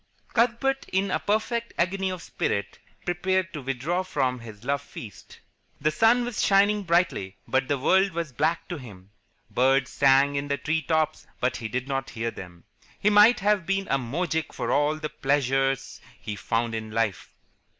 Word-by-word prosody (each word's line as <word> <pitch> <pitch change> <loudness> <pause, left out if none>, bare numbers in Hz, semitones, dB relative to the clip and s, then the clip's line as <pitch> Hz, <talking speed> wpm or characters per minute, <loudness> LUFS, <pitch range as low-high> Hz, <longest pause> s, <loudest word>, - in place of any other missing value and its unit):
Cuthbert 245 +3 +1
in 190 +1 +1
a - - +1
perfect 230 +3 -1
agony 190 +2 0
of 185 -2 -5
spirit 100 0 -2 0.3
prepared 185 +1 0
to 150 - -5
withdraw 135 +7 -1
from 135 -9 -1
this 110 -2 -11
love 140 +1 0
feast. 110 -7 -11 0.4
The 155 +2 +1
sun 225 +8 +4
was 245 -2 -2
shining 205 +1 +4
brightly, 170 - 0
but 130 0 +1
the 145 - +1
world 190 +8 +3
was 165 -3 -3
black 155 +6 0
to 175 - -3
him. 100 -6 -13 0.4
Birds 130 +1 +2
sang 140 +1 +4
in 140 0 -2
the 140 0 0
tree 160 +2 -1
tops, 155 0 0
but 125 - 0
he 115 - -4
did 125 +4 -3
not 135 -1 -2
hear 115 0 -3
them. 90 -4 -11 0.4
He 210 - +3
might 210 +3 +6
have 205 -3 +2
been 195 0 0
a 135 - +3
moujik 160 +5 -2
for - - -2
all 145 +1 +2
the 155 0 -4
pleasure 135 -1 +1 0.4
he 105 - -5
found 115 +2 -1
in 110 -1 -4
life. 110 -5 -2
145 Hz, 175 wpm, -26 LUFS, 125-190 Hz, 0.4 s, might